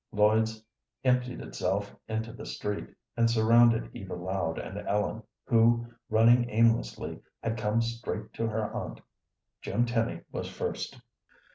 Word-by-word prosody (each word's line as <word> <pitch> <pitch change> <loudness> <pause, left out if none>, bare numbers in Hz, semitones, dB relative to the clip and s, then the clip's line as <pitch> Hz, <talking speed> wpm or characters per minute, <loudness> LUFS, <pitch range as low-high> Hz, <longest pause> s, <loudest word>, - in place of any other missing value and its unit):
Lloyd's 110 +1 +3 0.4
emptied 125 -1 +1
itself 100 +2 -2
into 110 +1 -3
the - - -9
street, 105 0 -3 0.3
and 115 0 +3
surrounded 115 0 +5
Eva 95 -2 -6
Loud 90 -2 -2
and - - -5
Ellen, 105 +2 0 0.2
who, 115 +1 +4 0.2
running 120 +2 +5
aimlessly, 115 +1 +1 0.2
had 115 - 0
come 110 +1 +1
straight 115 -2 -4
to 115 - -1
her 110 -1 -2
aunt. - - -5 0.6
Jim 120 - +1
Tenny 115 -1 0
was - - -4
first. - - -4
110 Hz, 130 wpm, -29 LUFS, 105-115 Hz, 0.6 s, surrounded